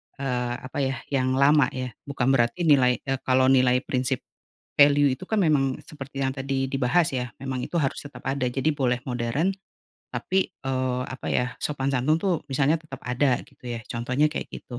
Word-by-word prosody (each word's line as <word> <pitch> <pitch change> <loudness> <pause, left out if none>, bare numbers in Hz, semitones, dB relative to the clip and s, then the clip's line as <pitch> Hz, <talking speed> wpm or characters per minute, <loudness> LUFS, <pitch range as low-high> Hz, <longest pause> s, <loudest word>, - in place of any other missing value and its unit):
eee, 125 -3 -2
apa 130 - -7
ya 135 -1 0 0.2
yang 130 -1 +1
lama 140 0 +5
ya 130 -1 -3 0.2
bukan 135 -2 +1
berarti 130 +7 +2
nilai, 130 -6 +4
eee, 135 -1 -2
kalau 130 0 +4
nilai 125 0 +4
prinsip, 130 -1 -1 0.6
value 145 0 +6
itu - - -8
kan 220 -2 +1
memang 135 -5 +2
seperti 140 -4 -8
yang 130 - +1
tadi 135 0 -1
dibahas 140 +5 +2
ya 125 -2 -3
memang 130 -2 -3
itu 170 - -1
harus 135 - 0
tetap 145 - -9
ada 135 -1 -1
jadi 135 +5 0
boleh 125 -3 +1
modern, 125 +8 0 0.6
tapi, 190 0 0
eee, 130 -1 -1
apa 130 - -7
ya 125 - +1
sopan 140 -2 -1
santun 135 +5 +2
tuh 180 +1 +1
misalnya 145 +4 +2
tetap 135 -5 -10
ada 125 +1 +2
gitu - - -25
ya 115 -1 -4
contohnya 125 +5 0
kayak - - -4
gitu, 120 - -8
135 Hz, 185 wpm, -25 LUFS, 125-145 Hz, 0.6 s, value